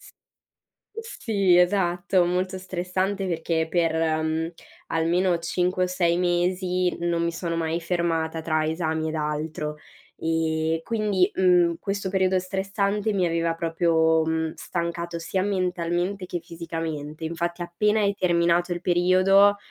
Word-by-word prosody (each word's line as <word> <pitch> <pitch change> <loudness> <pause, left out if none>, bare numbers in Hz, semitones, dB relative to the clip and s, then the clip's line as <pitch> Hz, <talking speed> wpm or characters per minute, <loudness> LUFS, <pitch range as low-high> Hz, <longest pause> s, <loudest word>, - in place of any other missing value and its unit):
S - - -16 1.1
sì, 200 -6 +3
esatto, 180 0 +2
molto 185 +2 -1
stressante 185 +2 -2
perché 165 -1 -1
per, 165 -2 +1 0.3
mhmm, 160 +1 -1 0.4
almeno 170 +2 +1
5 180 +2 0
o - - 0
6 175 -2 +1
mesi 180 +1 0
non 170 -1 0
mi 170 0 0
sono 170 0 -3
mai 165 +1 -1
fermata 165 -2 -1
tra 155 -1 0
esami 160 0 -1
ed 160 - -4
altro. 150 0 -3 0.4
Ehm, 160 0 0
quindi, 210 -3 +1
mhmm, 180 -2 +4
questo 195 -1 -3
periodo 190 -1 +2
stressante 200 +3 -1
mi 185 -3 +2
aveva 165 0 0
proprio, 165 -1 +2
mhmm, 160 0 -1
stancato 170 -1 -4
sia 185 +3 -2
mentalmente 185 -1 -1
che 175 - -3
fisicamente. 165 -2 -6
Infatti 170 +2 -3
appena 210 +5 +1
è 200 0 +1
terminato 175 -1 +2
il 175 - -3
periodo, 185 +3 +4
175 Hz, 130 wpm, -25 LUFS, 165-185 Hz, 1.1 s, mhmm